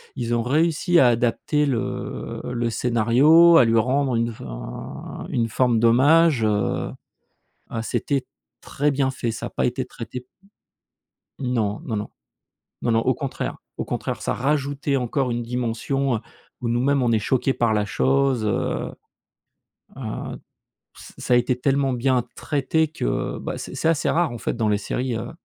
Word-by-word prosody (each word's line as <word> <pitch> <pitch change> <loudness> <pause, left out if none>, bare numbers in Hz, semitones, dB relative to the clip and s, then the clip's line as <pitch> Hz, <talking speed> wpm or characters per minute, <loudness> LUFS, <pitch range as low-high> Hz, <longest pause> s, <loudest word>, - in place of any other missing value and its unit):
Ils 120 -1 -2
ont 115 - 0
réussi 165 +5 +2
à 130 - +6
adapter 120 +5 +1
le 125 -2 -3
le 120 -1 -2
scénario, 125 +9 +5
à 120 - +7
lui 115 0 +3
rendre 130 +2 +1
une 115 0 0
fin - - -8
une 115 -2 0
forme 120 0 +2
d'hommage, 135 +3 +5
heu, 105 -2 0 0.8
ah 115 - -3
c'était 135 +3 -1 0.3
très 145 +1 -1
bien 135 -1 +1
fait, 125 -3 -3
ça 115 - -5
a - - -6
pas - - 0
été 125 +1 -1
traité 125 +1 -8 1.1
Non, 115 -5 -1
non, 115 -6 -2
non, 105 - -3 0.7
non, 120 - +1
non, 115 - +3
au 130 - +2
contraire 135 +2 -4 0.2
au - - -3
contraire - - -3
ça - - -1
rajoutait 140 +1 0
encore 125 0 -1
une 120 0 -1
dimension, 125 +2 -1
heu, - - -6 0.4
où 125 - -3
nous-mêmes 130 +4 +2
on 120 - +2
est 115 - +4
choqué 130 +5 +1
par 115 -3 +1
la 105 -1 +1
chose, 135 +1 +1
heu 100 - -1 1.1
heu, - - -5 0.6
ç - - -13
ça - - 0
a 120 - +7
été 125 +1 +1
tellement 135 0 +1
bien 125 0 +1
traité 155 +2 0
que, - - -2
bah, - - -4
c'est - - -7
c'est - - 0
assez 165 -2 +2
rare, 170 -3 +2
en 120 - -6
fait, - - -2
dans 115 -2 0
les 105 -1 +2
séries, 125 +4 -2
heu, 115 - -5
125 Hz, 165 wpm, -23 LUFS, 115-140 Hz, 1.1 s, à